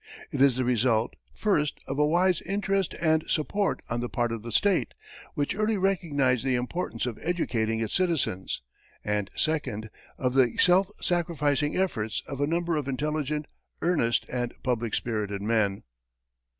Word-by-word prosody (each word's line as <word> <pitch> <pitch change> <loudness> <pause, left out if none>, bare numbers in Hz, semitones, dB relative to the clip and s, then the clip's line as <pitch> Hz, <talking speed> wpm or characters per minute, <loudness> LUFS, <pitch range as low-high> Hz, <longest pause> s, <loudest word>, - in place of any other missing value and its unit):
It - - -1
is 135 -3 +6
the 130 0 0
result, 120 -2 +2 0.2
first, 150 -9 0
of 135 +2 -3
a 150 - +5
wise 175 +2 +3
interest 195 -1 -1
and 160 -1 +3
support 195 +6 0
on 120 - -2
the 120 0 -3
part 120 -1 0
of 115 -2 -3
the 115 +1 -7
state, 190 - +2 0.4
which 145 -3 0
early 215 +1 +1
recognized 150 - +1
the 130 -1 +1
importance 125 -1 -2
of 120 -4 -4
educating 115 -10 0
its 110 - -2
citizens, 155 - 0 0.4
and, 105 -2 -1
second, 125 -9 -1 0.3
of 125 -1 0
the 130 -3 +3
self 185 +2 +5
sacrificing 150 -4 +1
efforts 110 - -1
of 140 0 -5
a 145 - +2
number 170 0 0
of 145 -3 -2
intelligent, 150 +2 -1 0.4
earnest, 155 -10 +2
and 120 -1 -3
public 120 -3 0
spirited 105 -4 -2
men. 105 -3 +1
140 Hz, 155 wpm, -27 LUFS, 115-170 Hz, 0.4 s, is